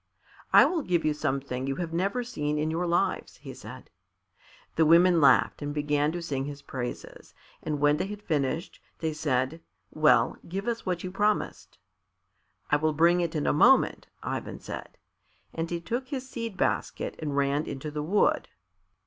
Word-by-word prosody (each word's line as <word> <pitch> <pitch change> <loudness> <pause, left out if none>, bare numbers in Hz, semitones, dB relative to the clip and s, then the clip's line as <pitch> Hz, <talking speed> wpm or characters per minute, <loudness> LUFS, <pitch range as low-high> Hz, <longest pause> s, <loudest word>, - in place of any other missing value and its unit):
"I - - +8
will 345 -3 0
give 175 - 0
you 155 - +2
something 135 -3 -2
you 135 - -1
have 165 0 -4
never 200 +8 0
seen 150 -11 -2
in 155 +1 0
your 175 +2 -1
lives," 170 +1 0
he - - -9
said. - - -11 0.8
The 160 - +4
women 170 +2 +6
laughed 145 - +4
and 145 0 -4
began 150 0 +1
to 175 -1 -4
sing 135 -4 -2
his 145 0 -7
praises, 125 -2 -7 0.3
and 150 -2 -3
when 145 +1 +4
they 190 - -2
had 210 0 -8
finished, 155 +1 -2 0.2
they 160 -1 -2
said, 145 0 -1 0.3
"Well, 155 0 +3
give 195 +5 -4
us 230 -4 -2
what 180 -2 -1
you 185 - -4
promised." 210 +2 -1 0.9
"I 145 - +5
will 155 +1 +1
bring 170 +3 +4
it 170 -1 -2
in 150 - -1
a - - +3
moment," 250 - +4 0.2
Ivan - - -4
said, - - -8 0.6
and 165 0 -3
he 170 - -2
took 240 +9 -3
his 260 -1 -5
seed 230 -6 -5
basket - - -1
and 145 -3 -3
ran 140 +2 +1
into 140 +2 -5
the 150 0 -3
wood. 190 +7 +2
160 Hz, 175 wpm, -28 LUFS, 145-180 Hz, 0.9 s, I